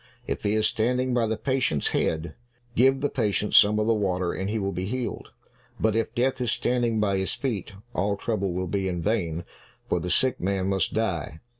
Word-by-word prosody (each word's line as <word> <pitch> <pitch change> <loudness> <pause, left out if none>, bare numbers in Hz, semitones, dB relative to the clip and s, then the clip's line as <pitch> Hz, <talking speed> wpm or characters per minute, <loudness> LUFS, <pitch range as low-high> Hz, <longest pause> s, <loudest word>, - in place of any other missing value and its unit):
If - - -3
he 105 +1 +1
is 110 - +2
standing 125 +3 +1
by 120 -2 +2
the 110 0 -1
patient's 130 - 0
head, 80 +1 -1 0.4
give 135 +4 +4
the 145 - +2
patient 105 -4 -1
some 105 +1 +7
of 105 - +1
the 115 - +3
water 95 -4 0
and 95 +1 -3
he 110 - -1
will 100 -2 -1
be 90 0 -3
healed, 125 +2 -4 0.5
but 110 -1 +2
if 115 +1 -1
Death 130 +1 +1
is 120 -3 +1
standing 120 -3 +1
by 100 -2 +1
his 95 0 0
feet, 110 -9 -3 0.2
all 100 +1 0
trouble 100 -4 -1
will 90 +1 -2
be 95 +1 -1
in 90 -2 -2
vain, 85 -6 -1 0.4
for - - +1
the 90 - -4
sick 130 +8 +3
man 95 +1 0
must 95 -1 0
die." 85 -8 -1
105 Hz, 205 wpm, -26 LUFS, 95-120 Hz, 0.5 s, some